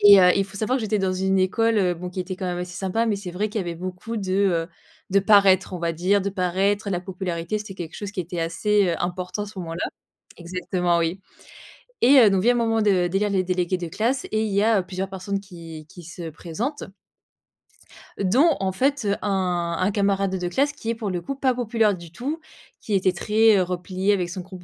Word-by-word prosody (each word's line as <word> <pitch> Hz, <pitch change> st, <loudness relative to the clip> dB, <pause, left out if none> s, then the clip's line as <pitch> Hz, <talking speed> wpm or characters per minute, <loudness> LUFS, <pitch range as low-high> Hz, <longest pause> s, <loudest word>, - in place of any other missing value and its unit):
Et 205 Hz, -1 st, +9 dB
heu, 180 Hz, -1 st, +7 dB
il 195 Hz, -, +2 dB
faut 200 Hz, -, -11 dB
savoir 245 Hz, +6 st, 0 dB
que -, -, -5 dB
j'étais 215 Hz, -1 st, 0 dB
dans 190 Hz, -1 st, 0 dB
une 190 Hz, +1 st, +1 dB
école, 225 Hz, +4 st, +2 dB
heu, 185 Hz, -3 st, +3 dB
bon 180 Hz, +2 st, -6 dB
qui 185 Hz, +1 st, -5 dB
était 185 Hz, +1 st, -4 dB
quand 185 Hz, 0 st, -5 dB
même 175 Hz, -1 st, -2 dB
assez 180 Hz, 0 st, -5 dB
sympa, 195 Hz, +4 st, 0 dB
mais 215 Hz, -3 st, 0 dB
c'est 190 Hz, -3 st, -6 dB
vrai 205 Hz, +4 st, -2 dB
qu'il 215 Hz, 0 st, -2 dB
y -, -, -3 dB
avait 170 Hz, -1 st, -4 dB
beaucoup 185 Hz, +6 st, -6 dB
de 190 Hz, -3 st, -3 dB
heu, 185 Hz, -4 st, +1 dB, 0.4 s
de 200 Hz, -, +4 dB
paraître, 195 Hz, -2 st, +4 dB
on -, -, -4 dB
va 170 Hz, 0 st, -1 dB
dire. 185 Hz, +4 st, +1 dB
De 200 Hz, -, -2 dB
paraître, 195 Hz, +2 st, 0 dB
la 180 Hz, -3 st, 0 dB
popularité 180 Hz, +1 st, -3 dB
c'était 210 Hz, -2 st, -8 dB
quelque 170 Hz, -3 st, -7 dB
chose 205 Hz, -2 st, -5 dB
qui 190 Hz, -, -4 dB
était 175 Hz, 0 st, -4 dB
assez, 200 Hz, +5 st, +1 dB
heu, 170 Hz, -, +1 dB
important 180 Hz, +3 st, -3 dB
à -, -, -5 dB
ce 200 Hz, -2 st, -10 dB
moment-là. 165 Hz, -1 st, -4 dB, 0.5 s
Exactement 175 Hz, 0 st, -1 dB
oui. 170 Hz, +3 st, -1 dB, 0.8 s
Et 265 Hz, +2 st, +7 dB
heu, 215 Hz, -4 st, +7 dB
donc 190 Hz, -1 st, +2 dB
vient 245 Hz, +2 st, +5 dB
le -, -, 0 dB
moment 225 Hz, -1 st, +1 dB
de 185 Hz, -4 st, +3 dB
d'élire 200 Hz, +3 st, 0 dB
les 190 Hz, -2 st, +2 dB
délégués 180 Hz, 0 st, 0 dB
de 175 Hz, -2 st, -5 dB
classe 230 Hz, +9 st, -1 dB
et, 215 Hz, 0 st, +1 dB
il 210 Hz, -, -2 dB
y 200 Hz, +1 st, +2 dB
a 225 Hz, -1 st, +4 dB
heu, 180 Hz, -, -7 dB
plusieurs 190 Hz, +1 st, -4 dB
personnes 195 Hz, +1 st, -3 dB
qui 165 Hz, -5 st, -11 dB
qui 175 Hz, -2 st, -13 dB
se 170 Hz, 0 st, -7 dB
présentent 195 Hz, -, -4 dB, 1.4 s
dont, 260 Hz, -, +4 dB
en 190 Hz, -1 st, 0 dB
fait 270 Hz, +5 st, 0 dB
heu, 200 Hz, 0 st, +2 dB
un 180 Hz, -4 st, 0 dB
un 185 Hz, +2 st, +2 dB
camarade 195 Hz, -1 st, +1 dB
de 180 Hz, -1 st, -3 dB
classe 280 Hz, +11 st, +1 dB
qui 230 Hz, -6 st, -6 dB
est, 230 Hz, -, 0 dB
pour 220 Hz, -3 st, -4 dB
le 180 Hz, -2 st, -2 dB
coup, 275 Hz, -, -4 dB
pas 265 Hz, -1 st, +1 dB
populaire 225 Hz, -4 st, +1 dB
du 170 Hz, -2 st, -12 dB
tout, 275 Hz, -, -4 dB, 0.4 s
qui 215 Hz, -, -5 dB
était 190 Hz, -1 st, +3 dB
très, 215 Hz, +3 st, +4 dB
heu, 185 Hz, -, +3 dB
replié 185 Hz, +2 st, -1 dB
avec 180 Hz, -3 st, -1 dB
son 185 Hz, 0 st, -5 dB
groupe 185 Hz, 0 st, -11 dB
190 Hz, 240 wpm, -24 LUFS, 180-210 Hz, 1.4 s, Et